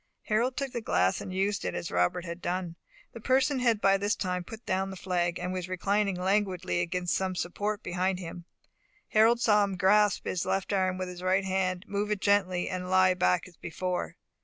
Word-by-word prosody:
Harold 235 +4 0
took 275 -1 -2
the 240 - -4
glass 90 - +1
and - - -6
used 195 +2 0
it 90 - -3
as 85 -1 -4
Robert 90 - +1
had 170 +1 -6
done. 175 -1 -3 0.4
The 230 - -9
person 260 +3 +2
had 235 -4 +2
by 195 -1 +4
this 205 +2 0
time 180 -1 -2
put 225 +5 -10
down 190 +1 0
the 190 - -7
flag, 175 -2 -1
and 180 +1 -3
was 180 -1 -4
reclining 200 +2 0
languidly 185 -1 0
against 180 0 -1
some 190 -1 -1
support 205 +4 -3
behind 185 +1 -1
him. 175 -1 -8 0.6
Harold 225 +2 +4
saw 210 -3 +4
him 195 -2 -2
grasp 205 +2 +3
his 180 - -1
left 195 +1 -1
arm 185 -1 +1
with 185 0 -3
his 180 0 -8
right 190 +1 +1
hand, 185 -1 -1
move 205 +1 -2
it 210 -1 0
gently, 190 -3 +2
and 185 -1 -4
lie 185 0 +5
back 180 0 +1
as 175 - -18
before. 180 +1 -3
185 Hz, 205 wpm, -29 LUFS, 180-205 Hz, 0.6 s, lie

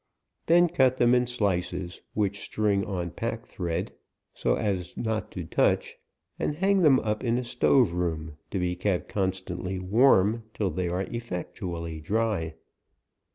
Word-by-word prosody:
Then 175 +1 +6
cut 130 -7 +3
them 120 0 +4
in 125 0 +3
slices, 90 -6 -1
which 100 -1 0
string 100 -2 0
on 90 -4 -3
pack 115 +5 -4
thread, 90 0 -3 0.4
so - - +1
as 95 -5 -2
not 110 -1 -2
to 90 - -4
touch, - - +1 0.4
and 150 - -1
hang 195 +4 +3
them 145 -7 +6
up 110 +1 -2
in 120 -1 +1
a 125 - -1
stove 125 -3 +3
room, 80 -3 -2
to - - -3
be 90 -1 0
kept 90 0 -1
constant 95 -2 -2
ly 95 +1 -3
warm, 105 +2 +4
till 100 -4 0
they 90 +2 -2
are 90 +2 -1
effectually 90 -7 -5
dry. 100 -3 -1
100 Hz, 155 wpm, -27 LUFS, 90-115 Hz, 0.4 s, Then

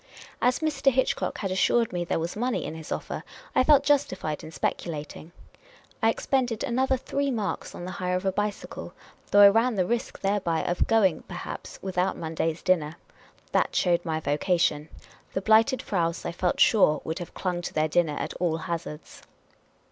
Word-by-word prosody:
As 250 +5 +2
Mr. 285 -3 +2
Hitchcock 260 +1 0
had 195 -3 -3
assured 225 +4 +2
me 175 -1 -1
there 170 - -1
was 165 +1 -3
money 245 +3 -1
in - - -5
his 160 -1 -9
offer, - - -4 0.3
I - - +4
felt 285 0 +5
justified 225 - 0
in - - -8
speculating. 155 +1 -4 0.7
I 225 - +4
expended 245 -1 0
another 265 +1 +1
three 280 +2 -2
marks 220 -6 -3
on 175 - -7
the 185 - -5
hire 180 0 -2
of 185 - -2
a 190 - +2
bicycle, 205 +1 -4 0.3
though 205 - +6
I 200 - +11
ran 225 +3 +2
the 185 -2 +1
risk 235 +4 -2
thereby 195 -5 0
of 175 - 0
going, 210 -7 +3
perhaps, 180 -1 -7
without 185 -1 0
Monday's 160 0 -2
dinner. 165 -5 +1 0.6
That - - +1
showed 175 -2 +2
my 160 -2 -2
vocation.. 155 0 0 0.4
The 190 - -1
Blighted 225 +5 +4
Fraus, 170 -4 -1
I - - -2
felt 175 +1 -1
sure, 155 -9 +5
would 160 +3 -4
have 175 - -8
clung 180 -2 -2
to - - -6
their 155 0 +2
dinner 155 -2 +1
at - - -3
all 165 -3 +1
hazards. 165 -2 -6
185 Hz, 180 wpm, -26 LUFS, 165-225 Hz, 0.7 s, I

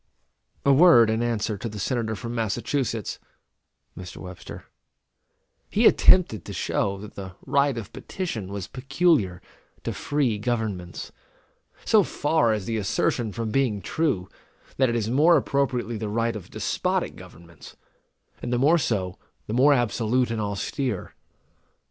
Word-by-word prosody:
A 140 - +6
word 135 -8 +7
in 110 +1 0
answer 110 -3 -1
to 115 - -4
the 105 - -8
Senator 110 +1 -1
from 120 +2 -6
Massachusetts 115 0 -2 0.8
[Mr. 90 +1 -9
Webster]. 90 -1 -9 1.1
He - - +2
attempted 140 - +5
to - - -8
show 100 0 -1
that 105 +2 -10
the 95 -2 -8
right 140 -2 +2
of 110 -3 -7
petition 120 - -5
was 100 -3 -4
peculiar 135 - +1 0.4
to - - -3
free 135 -8 0
governments. 105 -6 -3 0.7
So 215 - +5
far 150 - +1
is 105 -3 -1
the 115 -1 -2
assertion 110 +2 0
from 115 0 -4
being 120 -5 +1
true, 105 - -1 0.5
that 130 -2 +3
it 120 - -1
is 110 -2 -1
more 155 +6 +5
appropriately 130 -5 -1
the 110 -1 -3
right 115 +2 0
of 105 - -8
despotic - - -1
governments; 85 0 -14 0.6
and - - -4
the 120 - +2
more 150 +7 +4
so, 95 - -2 0.3
the 105 - -5
more 135 +5 +5
absolute 120 0 +1
and 115 -1 -2
austere. 105 +2 -3
115 Hz, 140 wpm, -25 LUFS, 105-135 Hz, 1.1 s, word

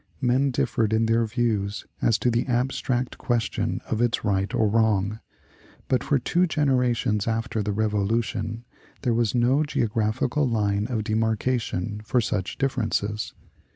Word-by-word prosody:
Men 130 +2 +2
differed 110 -3 0
in 110 +1 +3
their 115 0 +2
views 110 -4 -1 0.2
as 115 - +3
to 120 +3 +1
the 120 +3 0
abstract 125 0 -1
question 120 -3 -1
of 110 - -1
its 120 -2 +1
right 100 -1 +1
or 110 - +2
wrong, 105 -1 +1 0.7
but 130 - +1
for 145 - +2
two 175 +7 +1
generations 125 - +1
after 115 -1 -1
the 105 - -1
Revolution 110 +1 -1 0.4
there 120 - +2
was 115 0 +1
no 125 +5 +3
geographical 120 +1 0
line 105 -2 0
of 115 -4 -2
demarkation 110 -2 -1
for 125 +3 +1
such 105 -5 -2
differences. 110 -6 -1
115 Hz, 140 wpm, -25 LUFS, 105-125 Hz, 0.7 s, in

